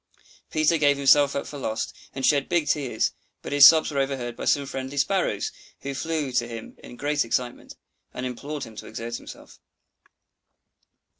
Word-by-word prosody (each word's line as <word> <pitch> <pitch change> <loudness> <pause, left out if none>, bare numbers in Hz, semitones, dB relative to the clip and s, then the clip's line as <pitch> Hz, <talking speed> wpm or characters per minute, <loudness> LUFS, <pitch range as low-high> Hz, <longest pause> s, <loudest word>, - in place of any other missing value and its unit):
Peter 155 +1 +2
gave 145 -1 +4
himself 140 0 +5
up 140 - -2
for 145 - -8
lost, 110 -3 -3 0.2
and 135 - -1
shed 140 -2 +2
big 170 -3 +2
tears; 135 -7 0 0.3
but - - -6
his 145 0 +10
sobs 160 0 +5
were 140 - -1
overheard 135 -3 -2
by - - -6
some 140 -1 +2
friendly 135 +1 -6
Sparrows, 160 - 0 0.3
who 140 - -4
flew 155 -1 -2
to 120 -1 0
him 115 -1 -8
in - - -10
great 145 +3 0
excitement, 120 +1 -3 0.4
and 125 - -5
implored 140 +4 -5
him 110 - -10
to - - -8
exert 115 0 -5
himself. - - -13
140 Hz, 170 wpm, -25 LUFS, 125-145 Hz, 0.4 s, his